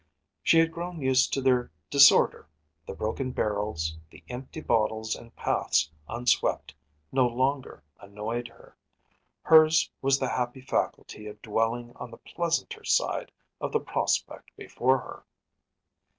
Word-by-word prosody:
She 165 Hz, -, +4 dB
had 165 Hz, 0 st, +4 dB
grown 170 Hz, +1 st, -6 dB
used 130 Hz, -1 st, +3 dB
to 135 Hz, -, -1 dB
their 125 Hz, -2 st, +2 dB, 0.2 s
disorder; 140 Hz, -, +6 dB, 0.4 s
the -, -, -6 dB
broken 115 Hz, +6 st, -3 dB
barrels, 100 Hz, -9 st, -2 dB
the -, -, -16 dB
empty 130 Hz, +5 st, -7 dB
bottles 110 Hz, -4 st, 0 dB
and 115 Hz, -, -14 dB
paths 80 Hz, -, 0 dB, 0.2 s
unswept 120 Hz, +1 st, 0 dB, 0.4 s
no 130 Hz, -2 st, +3 dB
longer 130 Hz, +3 st, -2 dB, 0.2 s
annoyed 105 Hz, +4 st, -5 dB
her; 115 Hz, -, -19 dB, 0.7 s
hers 160 Hz, 0 st, +5 dB
was 135 Hz, 0 st, +3 dB
the 130 Hz, -2 st, -2 dB
happy 125 Hz, +1 st, -3 dB
faculty 105 Hz, -4 st, -3 dB
of 105 Hz, 0 st, -10 dB
dwelling 115 Hz, +2 st, -1 dB
on 125 Hz, -, -8 dB
the 115 Hz, -, -12 dB
pleasanter 175 Hz, -, -3 dB
side -, -, 0 dB, 0.3 s
of -, -, -3 dB
the 450 Hz, -, +1 dB
prospect -, -, -2 dB
before -, -, +1 dB
her. -, -, -10 dB
125 Hz, 135 wpm, -27 LUFS, 110-140 Hz, 0.7 s, disorder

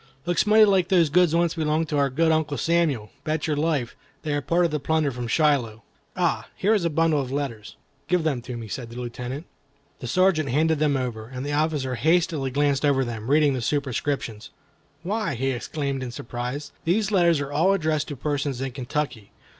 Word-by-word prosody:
"Looks 175 Hz, +4 st, +1 dB
mighty 215 Hz, +1 st, +7 dB
like 190 Hz, -4 st, +3 dB
those 175 Hz, -5 st, +3 dB
goods 175 Hz, 0 st, +4 dB
once 170 Hz, -1 st, +2 dB
belonged 155 Hz, 0 st, 0 dB
to 150 Hz, -, 0 dB
our 140 Hz, -1 st, +2 dB
good 160 Hz, +5 st, +2 dB
Uncle 155 Hz, -2 st, 0 dB
Samuel. 160 Hz, -10 st, +1 dB
Bet 155 Hz, 0 st, -1 dB
your 155 Hz, -, 0 dB
life, 145 Hz, -5 st, -1 dB, 0.3 s
they 150 Hz, -2 st, -2 dB
are -, -, +1 dB
a -, -, -6 dB
part 170 Hz, +5 st, +2 dB
of 165 Hz, -, 0 dB
the 150 Hz, -, -1 dB
plunder 155 Hz, 0 st, +1 dB
from 120 Hz, -1 st, -5 dB
Shiloh. 125 Hz, -6 st, +1 dB, 0.3 s
Ah! -, -, 0 dB
here 210 Hz, +3 st, +2 dB
is 205 Hz, -5 st, +1 dB
a 170 Hz, -, +1 dB
bundle 155 Hz, -1 st, +2 dB
of 130 Hz, -1 st, -6 dB
letters." 135 Hz, -7 st, -4 dB, 0.3 s
"Give 180 Hz, -2 st, +1 dB
them 145 Hz, -6 st, 0 dB
to 125 Hz, 0 st, -6 dB
me," 115 Hz, -1 st, -7 dB
said 115 Hz, +2 st, -6 dB
the 120 Hz, +1 st, -8 dB
Lieutenant. 125 Hz, +5 st, -5 dB, 0.5 s
The 125 Hz, -, -6 dB
Sergeant 175 Hz, -1 st, +2 dB
handed 155 Hz, +4 st, +2 dB
them 150 Hz, -2 st, +2 dB
over, 115 Hz, -4 st, -4 dB
and 130 Hz, +2 st, -6 dB
the 145 Hz, -, -2 dB
officer 150 Hz, -4 st, 0 dB
hastily 160 Hz, +1 st, +1 dB
glanced 140 Hz, +1 st, +1 dB
over 135 Hz, -2 st, +3 dB
them, 115 Hz, 0 st, -5 dB
reading 145 Hz, -1 st, +4 dB
the 130 Hz, -, -2 dB
superscriptions. 135 Hz, -4 st, -2 dB, 0.5 s
"Why," 205 Hz, -5 st, -1 dB
he 135 Hz, +3 st, 0 dB
exclaimed, 140 Hz, +2 st, -3 dB
in 130 Hz, -, -4 dB
surprise, 125 Hz, +4 st, -5 dB
"these 205 Hz, +5 st, +1 dB
letters 170 Hz, -5 st, +4 dB
are 145 Hz, 0 st, -4 dB
all 165 Hz, +7 st, +3 dB
addressed 155 Hz, -5 st, 0 dB
to 145 Hz, -, -5 dB
persons 140 Hz, -1 st, -2 dB
in 135 Hz, 0 st, -3 dB
Kentucky. 125 Hz, -4 st, -4 dB
145 Hz, 205 wpm, -24 LUFS, 130-160 Hz, 0.5 s, mighty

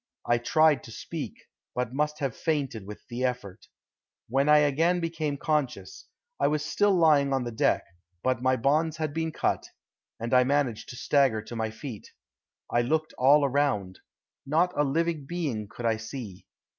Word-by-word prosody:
I 120 Hz, 0 st, +2 dB
tried 155 Hz, +4 st, +3 dB
to 115 Hz, -, -10 dB
speak, -, -, -6 dB, 0.4 s
but 125 Hz, 0 st, -2 dB
must 150 Hz, +2 st, 0 dB
have 135 Hz, -5 st, -1 dB
fainted 135 Hz, -10 st, -2 dB
with 105 Hz, -, -10 dB
the 120 Hz, +2 st, -4 dB
effort. 115 Hz, -6 st, -3 dB, 0.6 s
When 135 Hz, +5 st, +1 dB
I 150 Hz, -, +8 dB
again 155 Hz, +5 st, +3 dB
became 160 Hz, -4 st, -2 dB
conscious, 135 Hz, -, -2 dB, 0.3 s
I -, -, +3 dB
was 150 Hz, 0 st, 0 dB
still 205 Hz, +4 st, +2 dB
lying 150 Hz, -4 st, +4 dB
on 135 Hz, -1 st, +1 dB
the 120 Hz, -, -4 dB
deck, 110 Hz, -, +1 dB, 0.4 s
but 130 Hz, -2 st, +1 dB
my 130 Hz, 0 st, +3 dB
bonds 155 Hz, +6 st, +1 dB
had 155 Hz, -2 st, -2 dB
been 160 Hz, 0 st, -2 dB
cut, -, -, -1 dB, 0.5 s
and 115 Hz, +2 st, -3 dB
I 125 Hz, 0 st, +6 dB
managed 135 Hz, -3 st, 0 dB
to 125 Hz, -, -8 dB
stagger 130 Hz, -5 st, +2 dB
to 120 Hz, -, -8 dB
my 110 Hz, -1 st, -1 dB
feet. 110 Hz, 0 st, -8 dB, 0.6 s
I 120 Hz, -, +3 dB
looked 155 Hz, +6 st, -1 dB
all 140 Hz, +3 st, +6 dB
around. 130 Hz, -9 st, 0 dB, 0.4 s
Not 165 Hz, +6 st, +1 dB
a 145 Hz, -, +3 dB
living 155 Hz, 0 st, -1 dB
being 140 Hz, -12 st, -3 dB
could 120 Hz, +3 st, -8 dB
I 115 Hz, -1 st, +2 dB
see. 110 Hz, -4 st, -8 dB
140 Hz, 170 wpm, -27 LUFS, 120-155 Hz, 0.6 s, I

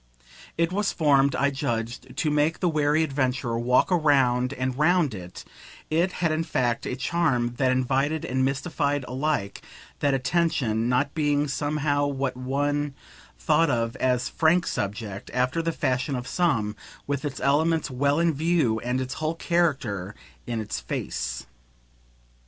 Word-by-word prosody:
It 165 Hz, +1 st, +1 dB
was 200 Hz, +2 st, 0 dB
formed, 140 Hz, -3 st, +3 dB
I 140 Hz, 0 st, +2 dB
judged, 125 Hz, -2 st, -4 dB
to 155 Hz, -, +1 dB
make 150 Hz, +2 st, +1 dB
the 180 Hz, -, +1 dB
wary 155 Hz, 0 st, +2 dB
adventurer 130 Hz, -5 st, -1 dB
walk 125 Hz, +8 st, +2 dB
round 135 Hz, -7 st, +3 dB
and 130 Hz, -2 st, -2 dB
round 155 Hz, -1 st, +3 dB
it 90 Hz, -2 st, -9 dB, 0.5 s
it 170 Hz, +4 st, +2 dB
had 170 Hz, -3 st, 0 dB
in 155 Hz, +1 st, 0 dB
fact 125 Hz, -7 st, -1 dB
a -, -, -2 dB
charm 130 Hz, -3 st, 0 dB
that 130 Hz, -1 st, +2 dB
invited 135 Hz, +4 st, 0 dB
and 130 Hz, +1 st, 0 dB
mystified 140 Hz, 0 st, -1 dB
alike 130 Hz, -7 st, -2 dB, 0.4 s
that 140 Hz, -1 st, +2 dB
attention; 130 Hz, -5 st, 0 dB
not 140 Hz, +3 st, +1 dB
being 145 Hz, -2 st, +1 dB
somehow 145 Hz, 0 st, 0 dB
what 135 Hz, -2 st, -2 dB
one 145 Hz, +2 st, -1 dB, 0.4 s
thought 110 Hz, -, +2 dB
of 115 Hz, -1 st, 0 dB
as 125 Hz, -1 st, +1 dB
a -, -, -8 dB
"frank" 170 Hz, +2 st, +3 dB
subject, 100 Hz, 0 st, -4 dB
after 125 Hz, +6 st, +1 dB
the 165 Hz, 0 st, -1 dB
fashion 130 Hz, -2 st, -1 dB
of 125 Hz, -1 st, -4 dB
some, 115 Hz, -12 st, 0 dB, 0.3 s
with 140 Hz, 0 st, -2 dB
its 145 Hz, -2 st, -4 dB
elements 155 Hz, +2 st, +1 dB
well 140 Hz, +3 st, +1 dB
in 170 Hz, -1 st, +2 dB
view 150 Hz, -7 st, +1 dB
and 125 Hz, +3 st, -1 dB
its 130 Hz, +1 st, -4 dB
whole 155 Hz, +1 st, -1 dB
character 135 Hz, -, 0 dB, 0.3 s
in 120 Hz, -2 st, -2 dB
its 105 Hz, -11 st, -3 dB
face. -, -, -4 dB
140 Hz, 150 wpm, -25 LUFS, 125-155 Hz, 0.5 s, formed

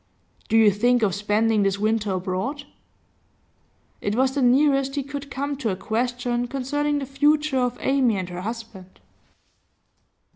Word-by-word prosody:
'Do 225 Hz, -, +3 dB
you 220 Hz, -2 st, +6 dB
think 240 Hz, +4 st, +2 dB
of 195 Hz, -3 st, +2 dB
spending 210 Hz, +2 st, +1 dB
this 195 Hz, 0 st, +1 dB
winter 215 Hz, -1 st, 0 dB
abroad?' 190 Hz, +10 st, -3 dB, 1.4 s
It 205 Hz, -, -1 dB
was 260 Hz, +2 st, +2 dB
the 280 Hz, -, -1 dB
nearest 275 Hz, +2 st, +3 dB
he 285 Hz, -, -1 dB
could 280 Hz, 0 st, -7 dB
come 280 Hz, +2 st, -3 dB
to 250 Hz, -5 st, -2 dB
a 190 Hz, -, -1 dB
question 245 Hz, +3 st, -2 dB
concerning 290 Hz, +3 st, -1 dB
the 280 Hz, -, -3 dB
future 295 Hz, +1 st, +1 dB
of 245 Hz, -1 st, -1 dB
Amy 260 Hz, -6 st, +2 dB
and 185 Hz, -1 st, -4 dB
her 180 Hz, 0 st, -6 dB
husband. 220 Hz, -3 st, -8 dB
245 Hz, 150 wpm, -23 LUFS, 210-275 Hz, 1.4 s, you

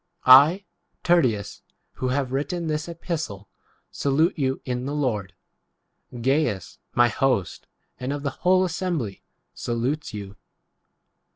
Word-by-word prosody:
22 130 Hz, -, +4 dB
I 155 Hz, +10 st, +8 dB, 0.4 s
Tertius, 125 Hz, -, +1 dB, 0.3 s
who 130 Hz, -, -4 dB
have 130 Hz, 0 st, -1 dB
written 165 Hz, +6 st, -2 dB
this 155 Hz, +1 st, -2 dB
epistle, 160 Hz, -, -5 dB, 0.4 s
salute 155 Hz, +6 st, +1 dB
you 135 Hz, -3 st, -1 dB
in 125 Hz, 0 st, -3 dB
[the] 145 Hz, -, -3 dB
23 150 Hz, -, -2 dB
Lord. 105 Hz, -9 st, -1 dB, 0.9 s
Gains 130 Hz, -, 0 dB, 0.2 s
my 120 Hz, 0 st, +6 dB
host 125 Hz, -6 st, -1 dB, 0.3 s
and 125 Hz, +2 st, -3 dB
of 145 Hz, 0 st, -4 dB
the 140 Hz, -, -1 dB
whole 185 Hz, +1 st, +4 dB
assembly, 165 Hz, -, -3 dB, 0.3 s
salutes 125 Hz, +6 st, -2 dB
you. 100 Hz, -2 st, -8 dB
135 Hz, 125 wpm, -24 LUFS, 120-160 Hz, 0.9 s, I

